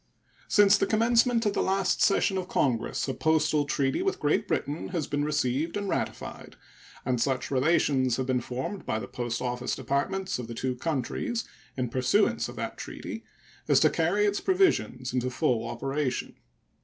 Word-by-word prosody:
Since 205 -1 +5
the 195 - +2
commencement 230 +1 +3
of 205 - +2
the - - 0
last 190 -1 +1
session 195 -1 +3
of 185 - -5
Congress 125 -9 0
a 135 - -1
postal 155 -1 +2
treaty 135 -1 0
with 390 +1 -1
Great 150 0 +1
Britain 145 +3 -2
has 170 -5 -2
been 145 0 -1
received 150 +3 0
and 200 -1 -3
ratified, - - -4 0.5
and 125 -2 0
such 135 0 -1
relations 130 -3 +2
have 130 - -1
been 130 -1 0
formed 130 +12 -5
by 110 - -1
the 100 -3 -5
post 120 +1 -3
office 125 0 -2
departments 185 +5 -1
of 120 - -5
the 115 - -7
two 130 +2 -2
countries 160 - -2 0.3
in 125 -1 0
pursuance 125 +1 +1
of - - -9
that - - -5
treaty - - -7 0.4
as - - +5
to - - +5
carry 185 +6 +2
its 205 0 0
provisions 365 - +1
into 125 0 0
full 120 -2 0
operation. 135 +3 -2
145 Hz, 170 wpm, -28 LUFS, 125-195 Hz, 0.5 s, Since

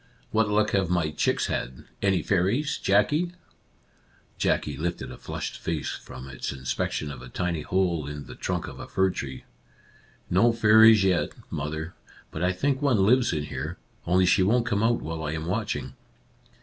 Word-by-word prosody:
What 110 -1 +2
luck 105 +1 +2
have 95 -3 +1
my 85 -3 +1
chicks - - +1
had? 60 +1 -4 0.2
Any 95 -5 +2
fairies, 100 - +1
Jackie? 145 - +2 0.5
" - - -35
Jackie 75 - +1
lifted 85 +5 -3
a - - -9
flushed - - -5
face 80 -3 -2
from 65 +1 -9
its 65 -3 -5
inspec 65 -1 -2
tion 75 - -3
of 65 - -9
a 65 - -10
tiny 85 +3 -2
hole 85 -4 0
in 75 -1 -6
the - - -10
trunk - - -3
of - - -9
a - - -7
fir 95 0 +2
tree. 65 -6 -6 0.5
" - - -30
No 120 0 +5
fairies 110 -1 +7
yet> 95 -2 +1 0.2
mother; 80 +3 -4 0.4
but 80 - -5
I 90 +1 +2
think 135 +9 0
one 120 -9 +3
lives 125 +3 +4
in 75 - -1
here, 75 +4 -5 0.3
only 90 +1 +4
she 95 +2 +4
won't 115 +6 +3
come 105 -3 0
out 115 +1 +2
while 80 0 -4
I 75 0 -2
am 80 0 -4
watching." 85 - -2
90 Hz, 185 wpm, -26 LUFS, 75-105 Hz, 0.5 s, fairies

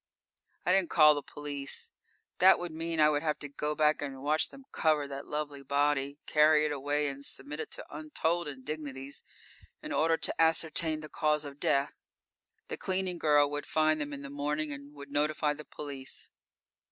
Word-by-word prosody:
I 180 - +3
didn't 190 -3 +3
call 150 -2 +7
the 145 - -3
police. 145 -1 -3 0.5
That 190 +1 +8
would 175 -1 -5
mean 165 +1 -3
I 150 0 +7
would 145 -1 0
have 155 -1 0
to 145 - -6
go 150 +2 -3
back 150 -1 +3
and 135 -2 -5
watch 155 +2 +2
them 275 -1 -14
cover 155 -3 +2
that 140 0 -7
lovely 150 -2 -4
body, 140 0 +1
carry 155 0 +5
it 150 - 0
away 145 +1 0
and 140 0 -5
submit 145 +2 -5
it - - -4
to - - -6
untold 160 +2 -1
indignities 140 0 -6 0.6
in - - -6
order 165 +1 +3
to 160 - +1
ascertain 160 -1 +2
the 155 - -8
cause 150 0 +1
of 140 0 -9
death. 140 +1 0 0.7
The - - -4
cleaning 185 -2 -1
girl 145 -2 +4
would 145 0 -4
find 155 -1 +2
them 145 0 -3
in 140 0 -6
the 140 - -7
morning 150 +1 -2
and 140 0 -8
would 140 0 -11
notify 150 +1 +1
the 150 0 -10
police. 140 -3 -7
150 Hz, 185 wpm, -31 LUFS, 145-155 Hz, 0.7 s, That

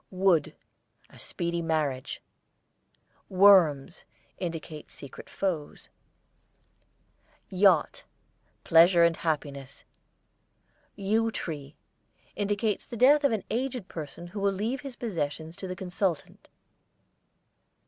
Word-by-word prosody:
WOOD, 185 -5 +1 0.6
a - - -16
speedy 170 0 -3
marriage. 155 -6 -2 1.1
WORMS 185 -6 +4 0.4
indicate 165 -3 -6
secret 140 - -12
foes. 170 -7 -4 1.6
YACHT, 185 -4 +3 0.6
pleasure 170 +1 +6
and 170 -1 +3
happiness. 140 -4 -4 1.1
YEW 215 +3 +1
TREE 150 -8 -6 0.6
indicates 205 0 -1
the 235 - -7
death 285 +5 +5
of 280 - +3
an 220 -4 -1
aged 245 -4 -3
person 160 +2 -8
who 175 +4 -7
will 200 0 +2
leave 220 +7 -3
his 270 -2 -8
possessions 160 -7 -4
to 190 - -7
the 185 - -5
consultant. 180 -3 -3
180 Hz, 95 wpm, -27 LUFS, 160-205 Hz, 1.6 s, pleasure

